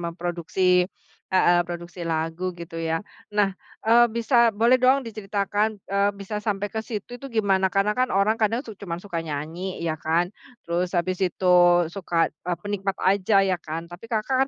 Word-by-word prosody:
memproduksi 175 +1 0 0.4
heeh, 175 -1 +5
produksi 175 +1 -7
lagu 165 +3 -2
gitu 170 -1 -8
ya. 165 0 -1 0.4
Nah, 200 -2 +3 0.3
eee, 235 +2 +6
bisa 235 0 +4
boleh 230 +5 +4
dong 260 +2 +5
diceritakan, 205 -1 -1 0.2
eee, 200 +1 +1
bisa 210 +1 -5
sampai 205 -1 -1
ke 220 - -2
situ 225 +2 -6
itu 275 - -7
gimana? 195 -3 +2
Karena 195 +2 +2
kan 255 0 +2
orang 200 +3 +3
kadang 225 +3 +2
su 225 - -8
cuman 175 -4 -5
suka 170 -4 -3
nyanyi 160 +5 -5
ya 160 -1 -1
kan. 170 +3 +1 0.4
Terus 175 +2 -1
habis 185 +2 -1
itu 180 0 +1 0.4
suka, 170 -4 0
eee, 175 +3 -4
penikmat 200 -1 -2
aja 195 +1 +4
ya 185 -2 +1
kan, 160 +2 -5
tapi 175 +6 -11
Kakak 260 +5 +2
190 Hz, 165 wpm, -24 LUFS, 175-210 Hz, 0.4 s, eee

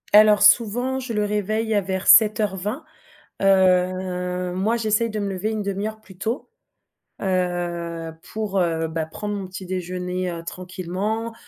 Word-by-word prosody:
Alors, 210 -1 +7
souvent, 240 +5 +4
je 255 -2 -6
le 210 -1 +1
réveille 215 +2 -1
à 205 - +3
vers 190 0 -3
7h20. 210 - +4 0.6
Heu, 180 -1 +2
moi, 215 +6 +1
j'essaye 220 +1 +1
de 215 - -4
me 200 - -2
lever 195 +3 -2
1/2 200 -2 -2
heure 220 0 -6
plus 190 -4 -16
tôt, 225 +6 -3 0.7
heu, 175 -3 -2 0.2
pour, 215 -3 -3
heu, 165 -2 0
bah, 160 0 -3
prendre 205 +6 -5
mon 195 -2 -5
petit 185 0 -8
déjeuner, 180 0 -3
heu, 165 0 -6
tranquillement. 185 +6 -4
195 Hz, 145 wpm, -23 LUFS, 180-215 Hz, 0.7 s, Alors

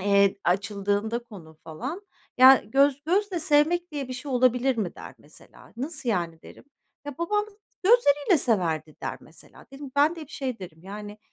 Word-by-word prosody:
eee, 200 0 +3
açıldığında 205 +4 0
konu 160 -8 -14
falan, 260 - -6 0.4
"Ya, 260 +1 +8
göz 275 +4 +2
gözle 375 +2 0
sevmek 320 +4 +2
diye 280 -3 -4
bir - - -5
şey 260 +2 -7
olabilir 250 +1 +2
mi?" 200 -6 -3
der - - -11
mesela. - - -18
"Nasıl 275 0 -5
yani?" 170 -6 -2
derim. - - -14 0.4
"Ya, 290 -2 -7
babam 415 +5 0 0.4
gözleriyle 360 - +4
severdi." 160 - -1
der - - -4
mesela. - - -18
Dedim 275 0 -9
ben 300 +4 +3
de - - -8
hep 305 - -10
şey 265 -7 -4
derim, 175 -4 -10
yani, 205 +2 -9
255 Hz, 165 wpm, -26 LUFS, 200-295 Hz, 0.4 s, Ya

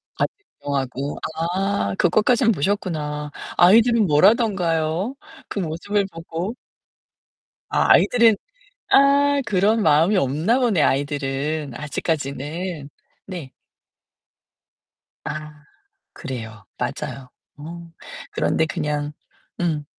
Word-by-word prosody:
같이 - - 0 0.3
구경하고. 140 0 -3 0.2
아 180 - -1
그것까진 225 +6 +3
보셨구나. 150 -5 -2 0.3
아이들은 220 +3 +5
뭐라던가요? 180 - +2 0.3
그 205 - -3
모습을 190 +5 -1
보고. 165 +6 -5 1.1
아 - - +4
아이들은 235 -3 +5 0.6
아 280 +1 +5
그런 210 +2 +2
마음이 160 +6 +4
없나 165 - +1
보네, 225 - +2
아이들은 140 +1 -1
아직까지는. 150 +2 -4 0.4
네. 175 -9 -7 1.7
아. 150 0 -7 0.5
그래요. 110 -8 -7
맞아요. 130 -2 -5 0.3
어. 170 +3 -9 0.4
그런데 160 - +1
그냥 150 -1 -3 0.5
음. 155 -4 -1
165 Hz, 205 characters per minute, -22 LUFS, 145-205 Hz, 1.7 s, 아이들은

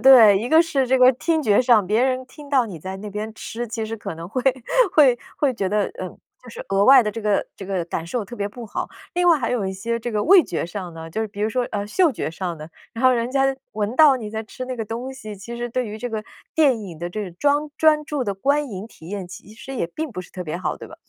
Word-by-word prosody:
对， 230 -7 +8
一 230 +4 -3
个 315 +4 +6
是 275 -6 0
这 260 +1 +3
个 255 +1 +7
听 320 +5 0
觉 205 -6 +4
上， 230 -6 +4
别 215 +4 +2
人 255 0 0
听 290 +2 -13
到 265 -4 +3
你 185 -6 -8
在 190 +4 -6
那 210 +2 -7
边 210 +2 -5
吃， 235 +2 -5
其 225 0 -3
实 225 - -5
可 205 - -6
能 165 +1 -8
会 250 +5 -2 0.5
会 260 -6 +5 0.2
会 275 -4 +1
觉 195 -5 -1
得， 210 0 +1 0.2
嗯， 185 -1 -7 0.2
就 250 - -14
是 - - -8
额 195 +1 +3
外 265 +1 +8
的 210 - -1
这 225 - -6
个 210 -1 +1
这 195 - -8
个 185 -3 -2
感 165 -1 -4
受 225 +3 -2
特 220 - -9
别 205 -3 -2
不 235 +3 -9
好。 - - -4 0.3
另 355 0 +3
外 330 -3 +6
还 245 - -2
有 240 -5 0
一 190 - -2
些 230 +5 -3
这 240 - -4
个 210 -2 0
味 375 +1 +7
觉 170 - -3
上 180 0 -6
呢， 165 0 -8
就 220 +6 -2
比 200 0 -9
如 215 - +2
说， 250 +3 0
呃， 205 -1 -3
嗅 345 - +3
觉 215 - -4
上 175 -1 -4
呢， 155 - -8 0.3
然 230 +3 -4
后 255 - +7
人 235 0 -1
家 270 0 +2 0.2
闻 210 +2 -2
到 290 -1 +7
你 225 -4 -6
在 220 0 -4
吃 240 +3 -8
那 255 0 -4
个 225 - -4
东 240 +5 -5
西， 215 -6 -9
其 235 +5 -8
实 240 0 -3
对 250 0 -2
于 215 +1 -7
这 245 - -4
个 220 -1 -4 0.3
电 275 -8 +4
影 175 -6 -9
的 175 +1 -4
这个专 215 - -1
专 305 -1 +4
注 290 -3 -2
的 200 - -2
观 280 +7 +1
影 195 +1 -6
体 160 - -15
验 195 -2 -5
其 200 +3 -11
实 270 +4 -8
也 195 - -1
并 310 - -5
不 195 - -5
是 180 - -12
特 185 - -5
别 165 -1 -4
好， 185 - -3
对 - - -10
吧？ - - -11
225 Hz, 305 characters per minute, -22 LUFS, 200-260 Hz, 0.5 s, 对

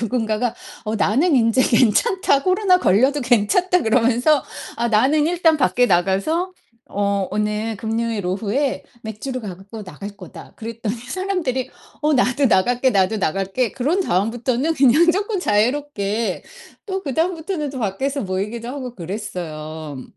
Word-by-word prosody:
누군가가 230 0 -1 0.3
어 215 +1 -2
"나는 275 - +2
인제 230 +2 +3
괜찮다. 275 - +3
코로나 370 0 +3
걸려도 260 - +3
괜찮다." 270 - +2
그러면서. 245 +5 +3 0.3
"아 235 - 0
나는 275 +8 +3
일단 335 -2 +3
밖에 245 -1 +2
나가서 195 - +1 0.4
어 200 -1 0
오늘 210 +1 -1
금요일 225 -2 -2
오후에 220 +9 -1 0.2
맥주를 235 +4 -5
갖고 200 +3 -8
나갈 200 +4 -9
거다." 180 -5 -12
그랬더니 230 0 -4
사람들이 265 -2 -3 0.3
"어 300 0 +3
나도 260 +1 +2
나갈게, 245 +5 +3
나도 200 +1 +2
나갈게." 195 +7 -1
그런 300 +10 0
다음부터는 240 - 0
그냥 280 +6 +4
쪼끔 405 +1 -1
자유롭게 215 - 0 0.4
또 385 -1 -2
그다음부터는 320 +1 -2
또 270 - -7
밖에서 265 +7 -2
모이기도 205 +5 -3
하고 255 -2 -6
그랬어요. 160 - -6
235 Hz, 320 characters per minute, -21 LUFS, 205-285 Hz, 0.4 s, 그냥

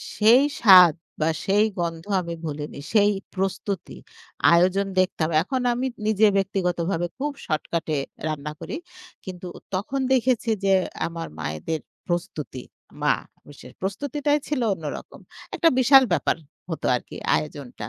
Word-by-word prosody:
সেই 230 +6 +6 0.2
স্বাদ 180 -7 +9 0.3
বা, 160 - +3 0.2
সেই 205 +2 +4
গন্ধ 165 0 -3 0.2
আমি 170 -1 -5
ভুলিনি। 150 -1 -5
সেই 205 -1 +5 0.2
প্রস্তুতি। 195 0 -3 0.6
আয়োজন 185 +3 +3
দেখতাম। 175 -4 +1
এখন 260 +5 -2
আমি 255 +2 -1 0.2
নিজে 215 0 +4
ব্যক্তিগতভাবে 180 -2 -1
খুব 295 +1 -1
শর্টকাটে 155 -1 -2 0.3
রান্না 150 -1 -4
করি। - - -5 0.5
কিন্তু 185 -1 -7 0.3
তখন 225 +8 -2
দেখেছি 250 -2 +1 0.2
যে 195 - +4 0.3
আমার 165 0 -6
মায়েদের 80 - -3 0.3
প্রস্তুতি 165 -7 -4 0.4
মা - - +4 0.3
বিশেষ 145 - -13
প্রস্তুতিটাই 285 +9 -1
ছিল 295 -4 -1
অন্যরকম। 155 -5 -7 0.4
একটা 330 - +4
বিশাল 265 +1 +7
ব্যাপার - - +1 0.3
হতো 160 - -4
আরকি - - -7 0.2
আয়োজনটা। 135 -8 -5
185 Hz, 125 wpm, -24 LUFS, 160-220 Hz, 0.6 s, স্বাদ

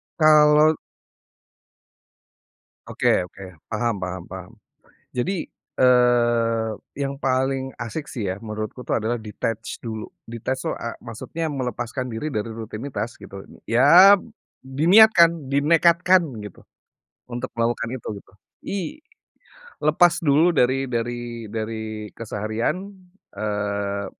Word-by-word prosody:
Kalau 155 0 +5 2.1
Oke 90 - +1
oke, 95 +2 -13 0.3
paham 115 0 0
paham 95 -1 -5
paham 95 +3 -9 0.6
jadi, 170 +9 -2 0.3
eee, 120 -3 +3 0.3
yang 140 -1 -2
paling 135 0 -1
asyik 120 +6 -4
sih 110 -7 -3
ya 95 - -2
menurutku 110 +3 -6
itu - - -4
adalah 115 +2 0
detach 110 0 -5
dulu. 110 -2 -6 0.2
Detach 125 +3 -3
tuh, - - -1
eee, 115 - -5
maksudnya 125 +8 -5
melepaskan 125 -2 -4
diri 115 +7 -3
dari 115 -5 -3
rutinitas 115 +1 -5
gitu, 100 - -10 0.2
ya 165 - +7 0.5
diniatkan, 170 +2 +5
dinekatkan 170 +6 +4 0.2
gitu 105 - -11 0.7
untuk 120 +1 -5
melakukan 115 0 0
itu - - -9
gitu. - - -26 0.4
I 200 - -2 1.0
lepas 170 +3 +3
dulu 160 +3 +4
dari 135 0 +2
dari 120 -2 -4
dari 110 -1 -5
keseharian, 110 - -2 0.6
eee, 100 -1 -2
120 Hz, 105 wpm, -23 LUFS, 110-145 Hz, 2.1 s, ya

